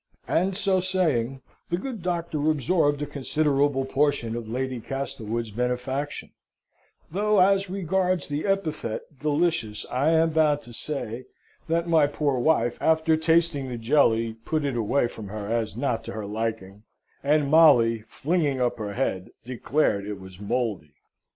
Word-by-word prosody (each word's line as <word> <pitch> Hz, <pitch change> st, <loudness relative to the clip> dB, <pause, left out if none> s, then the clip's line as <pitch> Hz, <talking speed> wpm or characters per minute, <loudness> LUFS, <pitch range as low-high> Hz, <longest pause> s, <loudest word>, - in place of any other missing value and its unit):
And 185 Hz, +2 st, +1 dB
so 195 Hz, -2 st, +3 dB
saying, 155 Hz, -9 st, 0 dB, 0.3 s
the 175 Hz, -, 0 dB
good 230 Hz, 0 st, -5 dB
Doctor 170 Hz, -4 st, -1 dB
absorbed 145 Hz, 0 st, +1 dB
a -, -, -1 dB
considerable 145 Hz, -1 st, 0 dB
portion 135 Hz, -4 st, 0 dB
of 115 Hz, -2 st, -6 dB
Lady 130 Hz, +1 st, -2 dB
Castlewood's 115 Hz, -3 st, -4 dB
benefaction; 125 Hz, +5 st, -3 dB, 0.8 s
though 210 Hz, +3 st, +2 dB
as 195 Hz, +1 st, +4 dB
regards 185 Hz, -1 st, 0 dB
the 145 Hz, +5 st, -3 dB
epithet 155 Hz, -, -1 dB, 0.2 s
delicious 145 Hz, -8 st, 0 dB
I 135 Hz, +5 st, +2 dB
am 165 Hz, 0 st, +3 dB
bound 150 Hz, -2 st, +2 dB
to 120 Hz, -, -12 dB
say, 125 Hz, -2 st, -5 dB, 0.4 s
that 165 Hz, +1 st, 0 dB
my 160 Hz, -3 st, +4 dB
poor 145 Hz, -3 st, -1 dB
wife, 120 Hz, -4 st, +2 dB
after 160 Hz, 0 st, +3 dB
tasting 160 Hz, -4 st, +1 dB
the 120 Hz, -, -4 dB
jelly, 115 Hz, -2 st, +2 dB
put 155 Hz, +2 st, -1 dB
it 140 Hz, -3 st, -1 dB
away 120 Hz, +4 st, +1 dB
from 110 Hz, -3 st, -9 dB
her 105 Hz, +1 st, -6 dB
as 115 Hz, -1 st, -2 dB
not 120 Hz, -5 st, -1 dB
to -, -, -6 dB
her 110 Hz, -1 st, -5 dB
liking; 105 Hz, -2 st, -4 dB, 0.4 s
and 145 Hz, 0 st, +2 dB
Molly, 125 Hz, -9 st, +6 dB
flinging 145 Hz, +4 st, -1 dB
up 120 Hz, -1 st, 0 dB
her 105 Hz, -2 st, -4 dB
head, 95 Hz, -8 st, -2 dB, 0.2 s
declared 120 Hz, -4 st, 0 dB
it 105 Hz, -2 st, -5 dB
was 95 Hz, -1 st, -12 dB
mouldy. 100 Hz, -, -2 dB
140 Hz, 150 wpm, -25 LUFS, 115-160 Hz, 0.8 s, Molly